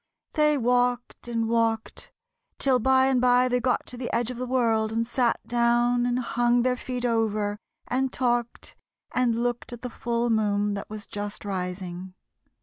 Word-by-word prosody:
They 300 Hz, -1 st, +3 dB
walked 245 Hz, 0 st, 0 dB
and 230 Hz, -1 st, -1 dB
walked, 225 Hz, -1 st, -1 dB, 0.5 s
till 260 Hz, -2 st, +2 dB
by 260 Hz, +2 st, +4 dB
and 265 Hz, -2 st, +2 dB
by 250 Hz, 0 st, +4 dB
they 250 Hz, 0 st, +1 dB
got 250 Hz, +1 st, 0 dB
to 250 Hz, -, -10 dB
the 240 Hz, 0 st, -4 dB
edge 235 Hz, +1 st, 0 dB
of 250 Hz, -, -7 dB
the 255 Hz, +1 st, -4 dB
world 225 Hz, -4 st, +1 dB
and 230 Hz, +1 st, 0 dB
sat 240 Hz, 0 st, +1 dB
down 240 Hz, +1 st, +2 dB
and 245 Hz, 0 st, 0 dB
hung 240 Hz, -1 st, +1 dB
their 255 Hz, 0 st, +2 dB
feet 250 Hz, 0 st, -4 dB
over 215 Hz, -3 st, 0 dB, 0.3 s
and 260 Hz, +1 st, 0 dB
talked 240 Hz, -2 st, -1 dB, 0.4 s
and 250 Hz, -2 st, +1 dB
looked 240 Hz, 0 st, -2 dB
at 240 Hz, -1 st, -8 dB
the 250 Hz, -, -4 dB
full 235 Hz, 0 st, -1 dB
moon 205 Hz, -2 st, +1 dB
that 200 Hz, -, -6 dB
was 210 Hz, -1 st, -7 dB
just 205 Hz, 0 st, -6 dB
rising. 180 Hz, -1 st, -5 dB
240 Hz, 170 wpm, -26 LUFS, 220-250 Hz, 0.5 s, by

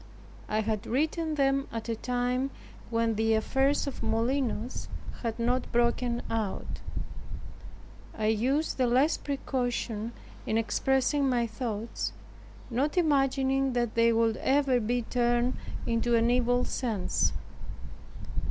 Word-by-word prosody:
I 215 Hz, +1 st, +1 dB
had 220 Hz, 0 st, -2 dB
written 315 Hz, +4 st, 0 dB
them 275 Hz, -1 st, +2 dB
at 230 Hz, 0 st, -5 dB
a 230 Hz, -, -1 dB
time 250 Hz, +3 st, 0 dB, 0.4 s
when 230 Hz, -1 st, +1 dB
the 220 Hz, +1 st, +2 dB
affairs 270 Hz, +6 st, +2 dB
of 280 Hz, -, -5 dB
Molinos 230 Hz, +1 st, -1 dB, 0.3 s
had 230 Hz, -2 st, -2 dB
not 245 Hz, +2 st, 0 dB
broken 240 Hz, 0 st, +1 dB
out, 220 Hz, -4 st, -3 dB, 1.4 s
I 215 Hz, -, -1 dB
used 255 Hz, +9 st, +1 dB
the 255 Hz, -, +4 dB
less 265 Hz, +7 st, +3 dB
precaution 245 Hz, -5 st, -2 dB, 0.3 s
in 220 Hz, -, +1 dB
expressing 265 Hz, +5 st, +2 dB
my 240 Hz, -2 st, +2 dB
thoughts, 225 Hz, -1 st, -3 dB, 0.6 s
not 280 Hz, +8 st, 0 dB
imagining 270 Hz, -4 st, +2 dB
that 240 Hz, -2 st, 0 dB
they 230 Hz, 0 st, +4 dB
would 225 Hz, -1 st, +2 dB
ever 270 Hz, -2 st, +3 dB
be 240 Hz, +2 st, 0 dB
turned 240 Hz, +1 st, +1 dB, 0.3 s
into 235 Hz, 0 st, +2 dB
an 230 Hz, +1 st, +3 dB
evil 245 Hz, 0 st, +2 dB
sense. 215 Hz, -8 st, 0 dB
245 Hz, 120 wpm, -29 LUFS, 225-270 Hz, 1.4 s, the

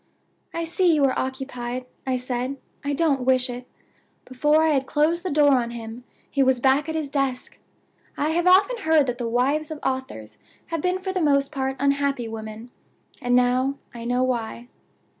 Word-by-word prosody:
'I 335 Hz, -, -1 dB
see 340 Hz, 0 st, +2 dB
you 290 Hz, -2 st, +3 dB
are 260 Hz, -, +2 dB
occupied,' 255 Hz, -2 st, -4 dB, 0.2 s
I 260 Hz, -1 st, +1 dB
said; 250 Hz, +2 st, -3 dB, 0.3 s
'I 285 Hz, 0 st, -1 dB
don't 285 Hz, -3 st, +1 dB
wish 255 Hz, 0 st, +2 dB
it.' 245 Hz, +1 st, -8 dB, 0.6 s
Before 295 Hz, +5 st, +2 dB
I 320 Hz, -, +3 dB
had 270 Hz, -3 st, +1 dB
closed 320 Hz, +3 st, +1 dB
the 370 Hz, -, -2 dB
door 290 Hz, -2 st, +4 dB
on 235 Hz, -1 st, -2 dB
him 235 Hz, +1 st, -8 dB, 0.2 s
he 280 Hz, -, 0 dB
was 260 Hz, -1 st, +3 dB
back 270 Hz, +4 st, +2 dB
at 320 Hz, -, -3 dB
his 305 Hz, -3 st, -3 dB
desk. 270 Hz, -3 st, -2 dB, 0.6 s
I 295 Hz, -, 0 dB
have 345 Hz, +2 st, +1 dB
often 400 Hz, +7 st, +5 dB
heard 315 Hz, -2 st, +3 dB
that 245 Hz, -1 st, -3 dB
the 235 Hz, -1 st, -2 dB
wives 275 Hz, +6 st, +1 dB
of 310 Hz, -, -5 dB
authors 260 Hz, -, -4 dB, 0.3 s
have 330 Hz, -2 st, -2 dB
been 365 Hz, +2 st, +1 dB
for 380 Hz, 0 st, -4 dB
the 370 Hz, -, -1 dB
most 280 Hz, -2 st, +2 dB
part 265 Hz, -2 st, -2 dB
unhappy 280 Hz, -3 st, +1 dB
women. 220 Hz, +1 st, -8 dB, 0.5 s
And 245 Hz, -1 st, +2 dB
now 255 Hz, +2 st, +2 dB, 0.2 s
I 235 Hz, -1 st, -8 dB
know 245 Hz, +1 st, +1 dB
why. 240 Hz, -1 st, -3 dB
270 Hz, 185 wpm, -24 LUFS, 245-300 Hz, 0.6 s, often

